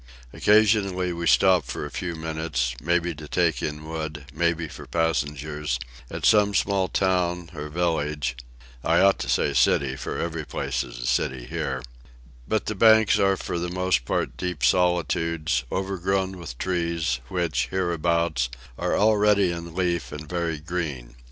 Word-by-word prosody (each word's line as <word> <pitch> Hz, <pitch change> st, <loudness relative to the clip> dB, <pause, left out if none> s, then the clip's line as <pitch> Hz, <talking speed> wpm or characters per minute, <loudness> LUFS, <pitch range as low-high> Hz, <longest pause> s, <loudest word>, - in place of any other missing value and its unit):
Occasionally, 100 Hz, -4 st, +3 dB
we 85 Hz, 0 st, -3 dB
stop 85 Hz, +5 st, +5 dB
for 60 Hz, +4 st, -5 dB
a 75 Hz, -, -8 dB
few 85 Hz, -2 st, -4 dB
minutes, 80 Hz, -6 st, -2 dB
maybe 85 Hz, +2 st, +1 dB
to 75 Hz, 0 st, -10 dB
take 85 Hz, -2 st, +1 dB
in 75 Hz, +1 st, -4 dB
wood, 80 Hz, -2 st, -5 dB
maybe 85 Hz, 0 st, 0 dB
for -, -, -10 dB
passengers, 75 Hz, -4 st, -1 dB, 0.3 s
at -, -, -4 dB
some 105 Hz, -2 st, +5 dB
small 95 Hz, -1 st, +2 dB
town 90 Hz, -2 st, 0 dB
or 75 Hz, -1 st, -6 dB
village 75 Hz, -6 st, -1 dB, 0.5 s
(I -, -, +3 dB
ought 100 Hz, 0 st, +4 dB
to -, -, -4 dB
say 70 Hz, -, +2 dB
city, 60 Hz, -2 st, +3 dB
every 80 Hz, -1 st, -3 dB
place -, -, -2 dB
is -, -, -10 dB
a -, -, -5 dB
city 65 Hz, 0 st, 0 dB
here); 65 Hz, -1 st, -3 dB, 0.6 s
but 110 Hz, -, 0 dB
the -, -, -2 dB
banks 110 Hz, +1 st, +5 dB
are 95 Hz, -1 st, +3 dB
for 85 Hz, -, -3 dB
the 90 Hz, +1 st, -2 dB
most 90 Hz, -7 st, +1 dB
part -, -, -2 dB
deep 90 Hz, -6 st, -4 dB
solitudes, 85 Hz, -5 st, +1 dB
overgrown 95 Hz, 0 st, -1 dB
with 70 Hz, -8 st, -8 dB
trees, 85 Hz, -7 st, -1 dB
which, 85 Hz, +1 st, -1 dB
hereabouts, 85 Hz, -6 st, 0 dB, 0.3 s
are -, -, 0 dB
already 105 Hz, -3 st, +4 dB
in 85 Hz, -1 st, -7 dB
leaf 90 Hz, -2 st, -1 dB
and 75 Hz, +1 st, -7 dB
very 85 Hz, -1 st, -2 dB
green. 75 Hz, -7 st, -4 dB
85 Hz, 150 wpm, -25 LUFS, 75-90 Hz, 0.6 s, stop